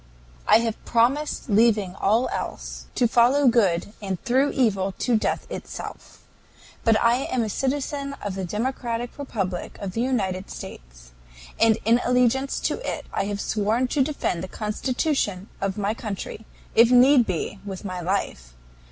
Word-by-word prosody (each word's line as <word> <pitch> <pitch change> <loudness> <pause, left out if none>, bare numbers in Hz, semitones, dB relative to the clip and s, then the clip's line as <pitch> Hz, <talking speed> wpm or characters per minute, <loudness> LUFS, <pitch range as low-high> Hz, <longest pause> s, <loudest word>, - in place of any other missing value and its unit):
"I 225 - +6
have 225 -2 -3
promised 260 +7 +1
leaving 210 -4 +3
all 220 +6 +2
else, - - -5
to 245 - +3
follow 250 +5 +4
good 205 -5 +2
and 190 -3 -3
through 265 +4 +2
evil, 195 -7 +1
to 245 - +1
death 215 - 0
itself. - - -8 0.6
But 225 -2 +4
I 235 +1 +4
am 250 -2 0
a 220 - -2
citizen 280 +3 -2
of 205 -2 -4
the 190 0 -4
democratic 235 +5 -3
republic 195 -10 -4
of 195 -2 -4
the 225 - -2
United 195 -7 -1
States; - - -10 0.5
and 225 -1 +5
in 235 +2 +4
allegiance 250 +2 +2
to - - -1
it - - -4
I - - 0
have 205 0 -3
sworn 220 +5 0
to 285 - +1
defend 265 - -1
the - - -4
Constitution 215 - -2
of 195 0 -1
my 205 +1 0
country, 215 -1 -6 0.3
if 230 +1 +6
need 250 0 +6
be, 185 +3 -3
with 195 0 -7
my 185 -2 -4
life. 165 - -2
225 Hz, 155 wpm, -24 LUFS, 195-250 Hz, 0.6 s, I